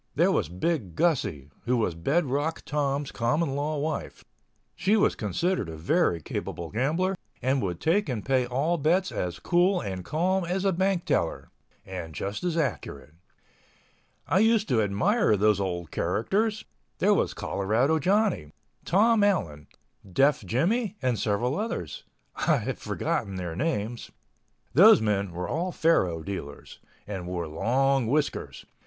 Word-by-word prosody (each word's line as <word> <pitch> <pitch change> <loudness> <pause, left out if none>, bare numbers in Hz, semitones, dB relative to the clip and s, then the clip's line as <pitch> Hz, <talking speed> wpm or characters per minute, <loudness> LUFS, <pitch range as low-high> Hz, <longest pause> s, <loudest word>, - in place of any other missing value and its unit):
There - - +4
was - - 0
Big 95 - -2
Gussie, 100 - 0
who 125 +1 +2
was 110 -7 0
Bed 140 - 0
Rock 145 +5 -2
Tom's 145 -1 -1
common 135 +6 0
law 150 +2 -1
wife. 155 +1 -4 0.5
She 195 +5 +2
was 205 - +3
considered 110 - -1
a 80 - -7
very 90 - +1
capable 85 +2 -5
gambler 160 - 0 0.2
and 130 +1 +1
would 90 -4 -3
take 190 +4 +1
and 115 -5 -3
pay 130 -2 +2
all 145 +7 0
bets 175 +6 +2
as 90 -1 -3
cool 180 +2 +2
and 95 -3 -5
calm 185 - 0
as 185 +3 -2
a 195 - +3
bank 190 0 0
teller—and 85 0 -4
just 100 - -4
as 175 -2 -1
accurate. 105 - -3 1.1
I 185 - +3
used 220 0 +3
to 115 -3 +3
admire 110 - +2
those 105 0 +3
old 85 -5 -3
characters. 205 - 0 0.3
There - - +3
was - - 0
Colorado 120 +11 +1
Johnny, 190 - +1 0.3
Tom 210 +4 +3
Allen, 90 - 0 0.4
Deaf 135 +4 +3
Jimmie 185 - 0
and 125 -4 +1
several 120 - 0
others... 90 - -4 0.3
I - - +2
have - - -4
forgotten 100 - -2
their 90 -3 -4
names. 120 - -2 0.6
Those 205 - +8
men 100 -3 0
were 90 +1 -4
all 180 +3 -2
faro 90 - +1
dealers—and 95 +2 -8
wore 90 -2 -3
long 130 - +1
whiskers 145 +4 -2
135 Hz, 145 wpm, -27 LUFS, -, 1.1 s, Those